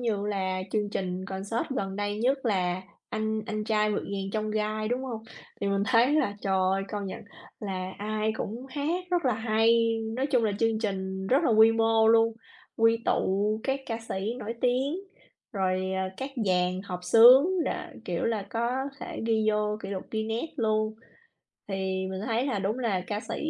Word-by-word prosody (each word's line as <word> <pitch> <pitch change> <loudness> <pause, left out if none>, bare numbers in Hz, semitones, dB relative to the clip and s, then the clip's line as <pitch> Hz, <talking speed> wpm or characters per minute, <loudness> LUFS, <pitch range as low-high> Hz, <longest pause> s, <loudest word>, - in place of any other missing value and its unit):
như 210 -4 -1
là 190 -2 -1
chương 210 -2 0
trình 185 -1 -3
concert 195 +4 -3
gần 195 -2 -2
đây 205 0 -2
nhất 260 +4 +2
là 185 -3 0 0.3
"Anh 220 0 -1
anh 215 0 -3
trai 215 -1 +2
vượt - - -1
ngàn 195 -1 -3
chông 215 -1 -1
gai", 215 0 -1
đúng 250 +3 -1
hông? 225 -4 -5 0.4
Thì 200 - 0
mình 200 0 +1
thấy 250 +3 +4
là, 205 -10 +1
trời 195 -1 0
ơi, 190 +1 +2
công 205 -2 -4
nhận 190 - -6 0.4
là 190 -2 -3
ai 215 +1 -1
cũng 240 +5 -5
hát 310 +7 -2
rất 350 -3 +1
là 250 -4 +3
hay, 225 +1 +3 0.2
nói 265 - +1
chung 250 -5 +2
là 210 - +1
chương 225 -1 +2
trình 190 -3 -3
rất 270 - +3
là - - +3
quy 220 0 +7
mô 225 0 +3
luôn, 225 0 +5 0.4
quy 225 0 +4
tụ 210 +3 +1
các 270 0 -1
ca 225 -1 -2
sĩ 200 +5 -2
nổi 230 0 -4
tiếng, 265 +7 +1 0.5
rồi, 185 -2 0
ờ, 190 0 -1
các 270 +1 -4 0.2
dàn 180 0 +1
hợp 180 -2 -5
xướng 245 +7 +8 0.2
rồi, - - 0 0.3
kiểu, 175 -2 -2
là 215 -4 -1
có 235 +1 0 0.3
thể - - -6
ghi 220 -1 +2
vô 210 0 0
kỷ - - -5
lục 190 -2 -4
Guinness 225 +8 -2
luôn. 215 -2 +1 0.7
Thì 190 -1 -2
mình 190 0 -4
thấy 235 +4 0
là 215 -7 -1
đúng 205 +6 -1
là 220 -7 0
ca 210 0 -2
sĩ - - -5
215 Hz, 190 wpm, -28 LUFS, 195-230 Hz, 0.7 s, xướng